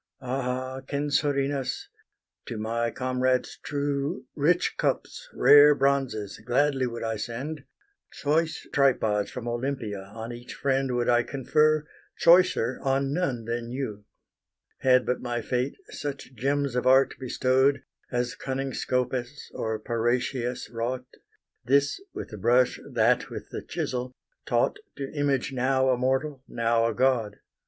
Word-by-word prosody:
Ah 130 Hz, 0 st, -3 dB
Censorinus! 140 Hz, -1 st, 0 dB, 0.6 s
to 115 Hz, -, -5 dB
my 115 Hz, +2 st, -1 dB
comrades 130 Hz, +1 st, 0 dB
true 145 Hz, +2 st, -2 dB
Rich 170 Hz, +5 st, +2 dB
cups, -, -, -2 dB
rare 145 Hz, 0 st, +7 dB
bronzes, 135 Hz, -7 st, 0 dB
gladly 135 Hz, +1 st, +2 dB
would 115 Hz, -1 st, -5 dB
I 115 Hz, -1 st, -2 dB
send: 135 Hz, +7 st, -5 dB, 0.5 s
Choice 160 Hz, +2 st, -1 dB
tripods 110 Hz, -7 st, +2 dB
from 120 Hz, -1 st, -6 dB
Olympia 120 Hz, -5 st, -3 dB
on 110 Hz, +4 st, -7 dB
each 120 Hz, +1 st, -9 dB
friend 135 Hz, -2 st, 0 dB
Would 120 Hz, -1 st, 0 dB
I 120 Hz, 0 st, +5 dB
confer, 150 Hz, +4 st, +2 dB, 0.3 s
choicer 180 Hz, +2 st, +4 dB
on 135 Hz, 0 st, +1 dB
none 135 Hz, -9 st, -1 dB
than 115 Hz, 0 st, -3 dB
you, 115 Hz, -5 st, -5 dB, 0.7 s
Had 130 Hz, -1 st, +4 dB
but 125 Hz, -, -1 dB
my 120 Hz, -1 st, -2 dB
fate 125 Hz, +4 st, -1 dB, 0.2 s
such 140 Hz, -2 st, -6 dB
gems 140 Hz, +2 st, 0 dB
of 125 Hz, -, 0 dB
art 135 Hz, +1 st, +5 dB
bestow'd 130 Hz, +2 st, +2 dB, 0.3 s
As 120 Hz, -1 st, -1 dB
cunning 135 Hz, 0 st, -3 dB
Scopas 125 Hz, +2 st, -2 dB
or 110 Hz, 0 st, -2 dB
Parrhasius 120 Hz, +2 st, -1 dB
wrought, 120 Hz, +2 st, -3 dB, 0.6 s
This 140 Hz, -, +2 dB
with -, -, -7 dB
the 105 Hz, -, -8 dB
brush, 120 Hz, +5 st, +3 dB
that -, -, +2 dB
with -, -, -8 dB
the -, -, -4 dB
chisel 125 Hz, 0 st, -3 dB, 0.3 s
taught -, -, +2 dB, 0.2 s
To 135 Hz, -1 st, -6 dB
image 140 Hz, -3 st, 0 dB
now 130 Hz, +1 st, +2 dB
a -, -, +3 dB
mortal, 130 Hz, +2 st, -1 dB
now 115 Hz, 0 st, +1 dB
a 115 Hz, -, -1 dB
god. 125 Hz, -4 st, +2 dB
130 Hz, 130 wpm, -27 LUFS, 120-140 Hz, 0.7 s, rare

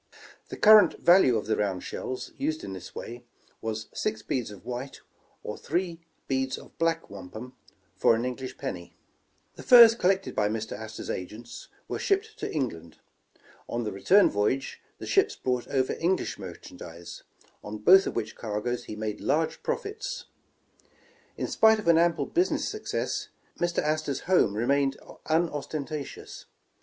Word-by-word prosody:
The -, -, -7 dB
current 215 Hz, -5 st, +7 dB
value 175 Hz, -10 st, +5 dB
of 105 Hz, -, -3 dB
the 110 Hz, -, +1 dB
round 100 Hz, -3 st, -1 dB
shells, 130 Hz, -, -5 dB
used 155 Hz, +2 st, -2 dB
in 95 Hz, -, -6 dB
this 95 Hz, -, -9 dB
way, 120 Hz, +1 st, -7 dB, 0.4 s
was 110 Hz, -1 st, -3 dB
six 110 Hz, 0 st, -2 dB
beads 125 Hz, -5 st, -2 dB
of 105 Hz, +1 st, -12 dB
white, 125 Hz, +2 st, -6 dB, 0.4 s
or 105 Hz, -, -6 dB
three 170 Hz, 0 st, -2 dB, 0.3 s
heads 130 Hz, 0 st, -1 dB
of -, -, -14 dB
black 165 Hz, -4 st, 0 dB
wampum, 100 Hz, +6 st, -9 dB, 0.4 s
for 105 Hz, -, +4 dB
an 115 Hz, +2 st, -2 dB
English 125 Hz, +1 st, -5 dB
penny. 85 Hz, -2 st, -6 dB, 0.6 s
The -, -, -8 dB
furs 235 Hz, -2 st, +9 dB
collected 195 Hz, -3 st, +1 dB
by 105 Hz, -1 st, +2 dB
Mr. 110 Hz, 0 st, -4 dB
Astor 110 Hz, +1 st, -7 dB
's -, -, -4 dB
agents 105 Hz, +6 st, -7 dB, 0.2 s
were -, -, -3 dB
shipped 420 Hz, +2 st, 0 dB
to -, -, -3 dB
England. 85 Hz, -, -4 dB, 0.7 s
On 120 Hz, 0 st, -2 dB
the 105 Hz, -, -3 dB
return 185 Hz, -, +5 dB
voyage 105 Hz, +7 st, -1 dB, 0.2 s
the -, -, -8 dB
ships 405 Hz, +2 st, +2 dB
brought 125 Hz, -1 st, -2 dB
over 130 Hz, -2 st, 0 dB
English 180 Hz, -, 0 dB
merchandise, 85 Hz, -2 st, -9 dB, 0.4 s
on 105 Hz, +1 st, -6 dB
both 190 Hz, -, +6 dB
of -, -, -4 dB
which 110 Hz, -1 st, -3 dB
cargoes 115 Hz, +3 st, -3 dB
he -, -, -7 dB
made 105 Hz, -1 st, -4 dB
large 155 Hz, +3 st, 0 dB
profits. -, -, -4 dB, 1.1 s
In -, -, -2 dB
spite 220 Hz, 0 st, +5 dB
of 210 Hz, -, -6 dB
an 165 Hz, -1 st, +6 dB
ample 170 Hz, 0 st, +2 dB
business 355 Hz, +2 st, 0 dB
success, 430 Hz, +1 st, -3 dB, 0.3 s
Mr. 175 Hz, 0 st, 0 dB
Astor 155 Hz, -2 st, 0 dB
's -, -, -4 dB
home 180 Hz, -, +3 dB
remained 135 Hz, +4 st, +1 dB, 0.3 s
unostentatious. 155 Hz, -2 st, -3 dB
130 Hz, 155 wpm, -27 LUFS, 110-170 Hz, 1.1 s, furs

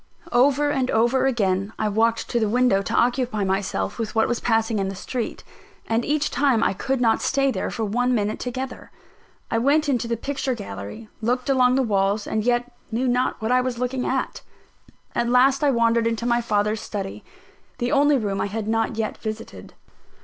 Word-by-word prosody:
Over 280 Hz, +4 st, +3 dB
and 260 Hz, -2 st, 0 dB
over 240 Hz, +4 st, +2 dB
again 200 Hz, -4 st, 0 dB
I 215 Hz, -, 0 dB
walked 225 Hz, +2 st, +1 dB
to 240 Hz, -, +1 dB
the 220 Hz, -2 st, +1 dB
window 245 Hz, -4 st, +3 dB
to -, -, -4 dB
occupy 245 Hz, -3 st, +1 dB
myself 195 Hz, +4 st, -2 dB
with 225 Hz, -1 st, -3 dB
what 220 Hz, -, +3 dB
was 240 Hz, -, -1 dB
passing 225 Hz, -2 st, +1 dB
in 195 Hz, -, 0 dB
the 195 Hz, -, -6 dB
street; 235 Hz, +5 st, -4 dB, 0.4 s
and 225 Hz, +1 st, 0 dB
each 295 Hz, +2 st, 0 dB
time 270 Hz, -6 st, +2 dB
I -, -, +2 dB
could 265 Hz, +7 st, -2 dB
not 230 Hz, -2 st, +2 dB
stay 275 Hz, 0 st, +1 dB
there -, -, -2 dB
for 225 Hz, -, -3 dB
one 245 Hz, +4 st, +1 dB
minute 210 Hz, -1 st, -1 dB
together. 255 Hz, +2 st, -5 dB, 0.6 s
I 230 Hz, -, +2 dB
went 290 Hz, +5 st, +2 dB
into 245 Hz, -4 st, 0 dB
the 230 Hz, 0 st, -1 dB
picture 270 Hz, +1 st, -2 dB
gallery, 195 Hz, -, -8 dB
looked 250 Hz, +4 st, 0 dB
along 255 Hz, -1 st, +4 dB
the 270 Hz, -, +2 dB
walls, 200 Hz, -1 st, +1 dB
and 215 Hz, -1 st, -1 dB
yet 245 Hz, +1 st, 0 dB, 0.2 s
knew 245 Hz, +4 st, 0 dB
not 250 Hz, +1 st, 0 dB
what 220 Hz, -, 0 dB
I 255 Hz, 0 st, +4 dB
was 250 Hz, -1 st, -3 dB
looking 250 Hz, +1 st, -2 dB
at. -, -, -2 dB, 0.7 s
At 235 Hz, -, 0 dB
last 265 Hz, +3 st, +4 dB
I 290 Hz, -, +4 dB
wandered 230 Hz, -2 st, +2 dB
into 230 Hz, 0 st, -2 dB
my 240 Hz, 0 st, +2 dB
father's 215 Hz, -1 st, 0 dB
study 195 Hz, -3 st, -5 dB, 0.5 s
the 245 Hz, 0 st, -1 dB
only 290 Hz, -1 st, +4 dB
room 200 Hz, -5 st, -2 dB
I -, -, 0 dB
had 210 Hz, +1 st, -4 dB
not 225 Hz, +1 st, 0 dB
yet 220 Hz, -1 st, -2 dB
visited. 215 Hz, 0 st, -7 dB
235 Hz, 195 wpm, -23 LUFS, 215-255 Hz, 0.7 s, along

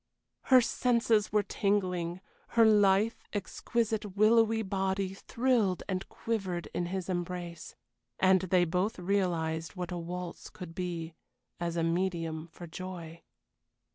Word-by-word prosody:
Her 255 Hz, -1 st, +7 dB
senses 235 Hz, -3 st, +2 dB
were 210 Hz, 0 st, +3 dB
tingling; 185 Hz, -4 st, 0 dB, 0.4 s
her 230 Hz, -, +8 dB
lithe, 210 Hz, +1 st, +5 dB, 0.2 s
exquisite, 210 Hz, 0 st, -2 dB
willowy 225 Hz, +1 st, +4 dB
body 190 Hz, -1 st, -1 dB
thrilled 230 Hz, -3 st, +1 dB
and 190 Hz, -1 st, -3 dB
quivered 190 Hz, -6 st, -3 dB
in 175 Hz, -, -1 dB
his 185 Hz, 0 st, -3 dB
embrace. 175 Hz, -2 st, -4 dB, 0.4 s
And 190 Hz, -1 st, +5 dB
they 185 Hz, -1 st, +3 dB
both 185 Hz, +6 st, 0 dB
realized 175 Hz, -3 st, -1 dB
what 180 Hz, -1 st, -4 dB
a 175 Hz, -, -3 dB
waltz 175 Hz, +1 st, -6 dB
could 175 Hz, -2 st, -9 dB
be, 170 Hz, -2 st, -4 dB, 0.5 s
as 170 Hz, -1 st, -2 dB
a 165 Hz, -, +1 dB
medium 165 Hz, -2 st, -1 dB
for 175 Hz, +1 st, -10 dB
joy. 170 Hz, -1 st, -7 dB
185 Hz, 125 wpm, -31 LUFS, 175-205 Hz, 0.5 s, her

